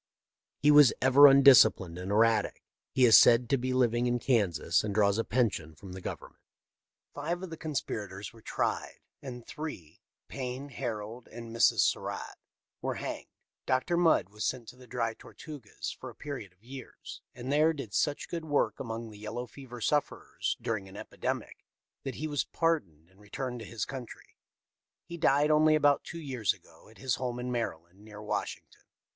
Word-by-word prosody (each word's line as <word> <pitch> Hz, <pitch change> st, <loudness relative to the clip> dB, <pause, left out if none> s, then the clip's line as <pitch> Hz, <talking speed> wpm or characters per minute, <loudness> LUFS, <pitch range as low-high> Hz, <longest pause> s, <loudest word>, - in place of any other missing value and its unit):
He 150 Hz, -, +6 dB
was 145 Hz, -3 st, +8 dB
ever 130 Hz, +2 st, +8 dB
undisciplined 120 Hz, -10 st, +6 dB
and 90 Hz, +1 st, -5 dB
erratic. 110 Hz, 0 st, +2 dB, 0.3 s
He 130 Hz, -, +4 dB
is 115 Hz, -, +8 dB
said 120 Hz, 0 st, +7 dB
to 135 Hz, -, +4 dB
be 130 Hz, +1 st, -2 dB
living 120 Hz, -1 st, +2 dB
in 120 Hz, 0 st, +1 dB
Kansas, 100 Hz, -9 st, +1 dB
and 105 Hz, -2 st, -3 dB
draws 100 Hz, 0 st, +3 dB
a -, -, +2 dB
pension 100 Hz, -12 st, -1 dB
from 95 Hz, +4 st, -11 dB
the 95 Hz, +1 st, -8 dB
Gov -, -, -4 dB
ernment. -, -, -17 dB, 0.4 s
" -, -, -61 dB
Five 175 Hz, +3 st, -3 dB
of 185 Hz, -, -7 dB
the -, -, -5 dB
conspirators 105 Hz, -11 st, -5 dB
were 115 Hz, -, -16 dB
tried, -, -, -2 dB, 0.3 s
and 125 Hz, -3 st, -8 dB
three, 150 Hz, -, -8 dB, 0.3 s
Payne, 130 Hz, +1 st, -5 dB
Harold, 115 Hz, -2 st, -5 dB
and 115 Hz, 0 st, -9 dB
Mrs. 115 Hz, -, +4 dB
Surratt, -, -, -2 dB, 0.4 s
were -, -, -2 dB
hanged. -, -, -5 dB, 0.4 s
Dr. 130 Hz, +7 st, +1 dB
Mudd 165 Hz, -, +3 dB
was 105 Hz, +1 st, -7 dB
sent 125 Hz, -3 st, -2 dB
to -, -, -12 dB
the 125 Hz, 0 st, -16 dB
Dry 115 Hz, -1 st, -2 dB
Tortugas 145 Hz, -2 st, -9 dB
for -, -, -9 dB
a -, -, -13 dB
period 135 Hz, -10 st, -7 dB
of 90 Hz, +3 st, -34 dB
years, 130 Hz, +2 st, -10 dB
and 125 Hz, +2 st, -5 dB
there 155 Hz, +3 st, +4 dB
did 135 Hz, -10 st, -7 dB
such 145 Hz, -1 st, 0 dB
good 170 Hz, -2 st, -5 dB
work 145 Hz, -2 st, 0 dB
among 115 Hz, -2 st, -5 dB
the 105 Hz, -, -13 dB
yellow 110 Hz, +4 st, -5 dB
fever 125 Hz, 0 st, -11 dB
sufferers 145 Hz, +6 st, -1 dB
during 100 Hz, -4 st, -3 dB
an 95 Hz, -, -11 dB
epi -, -, -10 dB
demic -, -, -3 dB, 0.4 s
that 135 Hz, -, -5 dB
he 155 Hz, -, -4 dB
was 145 Hz, -2 st, 0 dB
pardoned 95 Hz, -, -1 dB
and 95 Hz, -, -25 dB
returned 125 Hz, +4 st, -5 dB
to 110 Hz, -, -9 dB
this 115 Hz, -3 st, -3 dB
country. 130 Hz, -4 st, -9 dB, 0.7 s
He 170 Hz, 0 st, -8 dB
died 150 Hz, -2 st, +3 dB
only 155 Hz, 0 st, +5 dB
about 145 Hz, -2 st, +3 dB
two 170 Hz, -, -8 dB
years 130 Hz, -, -1 dB
ago -, -, -20 dB
at 110 Hz, -, -18 dB
his 130 Hz, -2 st, -1 dB
home 125 Hz, -1 st, -3 dB
in 125 Hz, 0 st, -4 dB
Maryland, 95 Hz, -6 st, -4 dB
near 105 Hz, -1 st, -11 dB
Washington. 105 Hz, -, -5 dB
120 Hz, 185 wpm, -30 LUFS, 105-140 Hz, 0.7 s, was